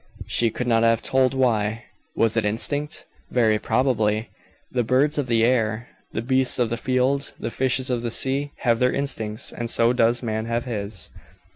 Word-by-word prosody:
She 115 Hz, -, +2 dB
could 125 Hz, +3 st, -4 dB
not 115 Hz, -2 st, +2 dB
have 115 Hz, 0 st, +2 dB
told 130 Hz, 0 st, +2 dB
why. 115 Hz, -3 st, +1 dB, 0.3 s
Was 115 Hz, -1 st, +2 dB
it 115 Hz, -, +1 dB
instinct? 145 Hz, +8 st, -1 dB, 0.2 s
Very 110 Hz, -3 st, +2 dB
probably. 110 Hz, -3 st, 0 dB, 0.4 s
The 125 Hz, -, 0 dB
birds 135 Hz, +6 st, +2 dB
of 140 Hz, -, -1 dB
the 115 Hz, -1 st, +3 dB
air, 115 Hz, -1 st, 0 dB, 0.2 s
the 110 Hz, -, -3 dB
beasts 130 Hz, +1 st, +2 dB
of 120 Hz, -2 st, 0 dB
the -, -, +1 dB
field, 130 Hz, +3 st, 0 dB
the -, -, -4 dB
fishes 130 Hz, +1 st, 0 dB
of 120 Hz, -2 st, -1 dB
the 120 Hz, -, -2 dB
sea, 135 Hz, +4 st, 0 dB
have 115 Hz, -2 st, +2 dB
their 125 Hz, 0 st, +3 dB
instincts, 110 Hz, -6 st, -2 dB
and 120 Hz, 0 st, -4 dB
so 115 Hz, +1 st, +3 dB
does 120 Hz, 0 st, +2 dB
man 110 Hz, -1 st, -2 dB
have 115 Hz, +1 st, -2 dB
his. 100 Hz, -, -5 dB
120 Hz, 180 wpm, -23 LUFS, 110-130 Hz, 0.4 s, the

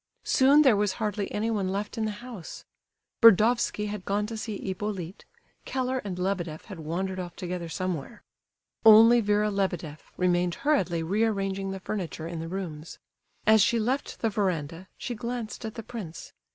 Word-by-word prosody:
Soon 280 Hz, +3 st, +5 dB
there 260 Hz, -6 st, +6 dB
was 205 Hz, -1 st, +1 dB
hardly 210 Hz, -2 st, -3 dB
anyone 210 Hz, -3 st, -1 dB
left 200 Hz, +2 st, -3 dB
in 225 Hz, -, -1 dB
the -, -, -1 dB, 0.2 s
house. 220 Hz, -10 st, -9 dB, 0.6 s
Burdovsky 230 Hz, 0 st, +5 dB
had 205 Hz, -2 st, -5 dB
gone 205 Hz, +2 st, 0 dB
to 225 Hz, +1 st, -6 dB
see 215 Hz, -1 st, -4 dB
Hippolyte; 190 Hz, -2 st, -5 dB, 0.4 s
Keller 260 Hz, 0 st, -1 dB
and 195 Hz, -6 st, -5 dB
Lebedeff 180 Hz, -4 st, -2 dB
had 195 Hz, -6 st, -9 dB
wandered 185 Hz, +4 st, -3 dB
off 175 Hz, -2 st, -6 dB
together 180 Hz, -2 st, -5 dB
somewhere. 180 Hz, -, -4 dB, 0.6 s
Only 225 Hz, +2 st, +8 dB
Vera 210 Hz, 0 st, +2 dB
Lebedeff 175 Hz, -6 st, -3 dB
remained 180 Hz, -1 st, +1 dB
hurriedly 180 Hz, -, +2 dB
rearranging 195 Hz, 0 st, 0 dB
the 190 Hz, 0 st, -4 dB
furniture 180 Hz, -5 st, -4 dB
in 170 Hz, -1 st, -5 dB
the 165 Hz, -, -5 dB
rooms. 170 Hz, -4 st, -6 dB, 0.5 s
As 220 Hz, 0 st, +6 dB
she 235 Hz, +4 st, +3 dB
left 255 Hz, +6 st, -2 dB
the 225 Hz, -, +1 dB
verandah, 180 Hz, -4 st, -2 dB
she 245 Hz, -, -4 dB
glanced 235 Hz, -1 st, -5 dB
at 220 Hz, -, -6 dB
the 225 Hz, -, -6 dB
prince. 200 Hz, -9 st, -8 dB
200 Hz, 160 wpm, -27 LUFS, 180-220 Hz, 0.6 s, Only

